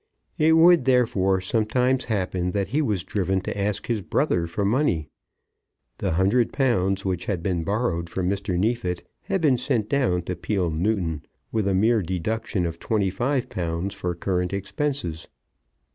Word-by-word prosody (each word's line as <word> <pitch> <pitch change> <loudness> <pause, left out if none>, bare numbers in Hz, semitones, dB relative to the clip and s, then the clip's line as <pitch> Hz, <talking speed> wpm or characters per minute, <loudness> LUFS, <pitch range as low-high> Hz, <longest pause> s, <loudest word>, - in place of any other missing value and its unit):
It 160 +1 +5
would 165 -3 +6
therefore 100 -7 +2
sometimes 125 +6 +1
happen 95 -4 -1
that 100 -2 -1
he 145 +7 +1
was 105 - 0
driven 95 -1 0
to - - -4
ask 100 0 -1
his 115 -3 -1
brother 85 -1 0
for 100 +4 -2
money. 100 - +1 0.9
The - - 0
hundred 100 +8 +2
pounds 100 -8 +1
which 90 -2 -1
had 90 -5 -2
been 90 -3 0
borrowed 95 -4 -1
from 90 +1 -2
Mr. 100 -1 -1
Neefit 100 -3 -1 0.2
had 195 -2 -1
been 140 -6 +4
sent 120 -4 -1
down 120 -11 +1
to 90 - -3
Peele 95 -5 -1
Newton 85 -2 -1 0.3
with 110 -3 0
a 95 - +2
mere 110 +3 +3
deduction 95 +2 -2
of 85 0 -4
£25 100 - -1
for 90 -3 -3
current 90 +1 -1
expenses. 100 - -3
100 Hz, 155 wpm, -24 LUFS, 90-120 Hz, 0.9 s, would